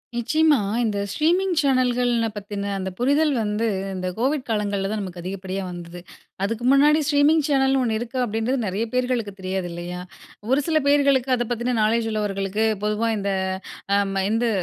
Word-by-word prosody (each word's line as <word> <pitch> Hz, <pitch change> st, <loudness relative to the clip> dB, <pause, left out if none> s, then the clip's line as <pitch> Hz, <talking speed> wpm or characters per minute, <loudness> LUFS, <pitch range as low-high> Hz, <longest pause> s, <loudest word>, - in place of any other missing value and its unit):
நிச்சயமா, 305 Hz, +5 st, +3 dB, 0.3 s
இந்த 215 Hz, -3 st, -1 dB
ஸ்ட்ரீமிங் 355 Hz, -, +2 dB
சேனல்கள் 250 Hz, -3 st, +2 dB, 0.2 s
பத்தின 200 Hz, 0 st, -4 dB
அந்த 190 Hz, 0 st, -3 dB
புரிதல் 285 Hz, +5 st, +2 dB
வந்து 210 Hz, +2 st, -1 dB, 0.3 s
அந்த 185 Hz, -1 st, -3 dB
கோவிட் 270 Hz, +3 st, 0 dB
காலங்கள்ல 200 Hz, -2 st, -1 dB
தான் 215 Hz, -, -2 dB
நமக்கு 180 Hz, -3 st, -7 dB
அதிகப்படியா 190 Hz, +1 st, -4 dB
வந்தது. 175 Hz, 0 st, -8 dB, 0.4 s
அதுக்கு 230 Hz, +4 st, -2 dB
முன்னாடி 295 Hz, +3 st, +5 dB
ஸ்ட்ரீமிங் 300 Hz, +1 st, +4 dB
சேனல்னு 270 Hz, -2 st, +3 dB
ஒண்ணு 225 Hz, -2 st, 0 dB
இருக்கா, 240 Hz, +2 st, -5 dB
அப்படின்றது 225 Hz, +4 st, -1 dB
நெறைய 200 Hz, +3 st, -1 dB
பேர்களுக்கு 250 Hz, -5 st, -1 dB
தெரியாது 185 Hz, -1 st, -3 dB
இல்லையா? 175 Hz, +1 st, -6 dB, 0.5 s
ஒரு 270 Hz, +2 st, +4 dB
சில 315 Hz, -1 st, +2 dB
பேர்களுக்கு 280 Hz, -2 st, +3 dB
அத 240 Hz, 0 st, -1 dB
பத்தின 240 Hz, +1 st, -1 dB
நாலேஜ் 225 Hz, +2 st, +2 dB
உள்ளவர்களுக்கு 205 Hz, 0 st, -1 dB, 0.2 s
பொதுவா 210 Hz, +2 st, 0 dB
இந்த 200 Hz, 0 st, -1 dB, 0.6 s
அ -, -, +5 dB, 0.2 s
ம 195 Hz, -, 0 dB
இந்து 230 Hz, +1 st, +1 dB
230 Hz, 155 wpm, -23 LUFS, 200-270 Hz, 0.6 s, முன்னாடி